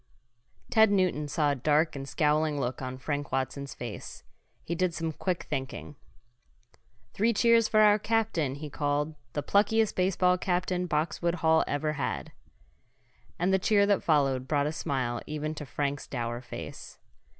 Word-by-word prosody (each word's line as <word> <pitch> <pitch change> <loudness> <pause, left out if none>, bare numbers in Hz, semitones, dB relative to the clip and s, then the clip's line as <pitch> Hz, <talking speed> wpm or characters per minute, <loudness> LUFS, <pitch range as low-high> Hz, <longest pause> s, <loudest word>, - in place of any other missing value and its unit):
Ted 220 -2 +6
Newton 185 -7 +1
saw 145 0 +1
a - - 0
dark 150 +4 +2
and 135 0 -6
scowling 150 0 +1
look 125 -1 -3
on 130 0 -5
Frank 145 +1 -3
Watson's 135 +1 -3
face. 120 -3 -7 0.4
He 170 - -3
did 175 -1 0
some 165 -1 -2
quick 180 +3 -2
thinking. 135 +2 -5 1.2
"Three 230 +3 +2
cheers 230 +1 +4
for 215 0 +4
our 210 0 +6
captain!" 210 -11 0
he 150 +2 -7
called. 145 +1 -1 0.2
"The 145 - -2
pluckiest 220 +2 +2
baseball 180 -1 +2
captain 180 0 -1
Boxwood 170 +2 0
Hall 160 0 +5
ever 150 +1 -1
had." 150 - -3 1.1
And 180 +3 +1
the 190 - +4
cheer 200 +1 +3
that 200 -1 +2
followed 135 -5 +1
brought 145 -1 +1
a 150 - 0
smile 125 -6 -2
even 155 0 -3
to 150 -2 -7
Frank's 140 +1 -3
dour 120 -1 -3
face. 120 - -9
155 Hz, 155 wpm, -28 LUFS, 140-185 Hz, 1.2 s, Ted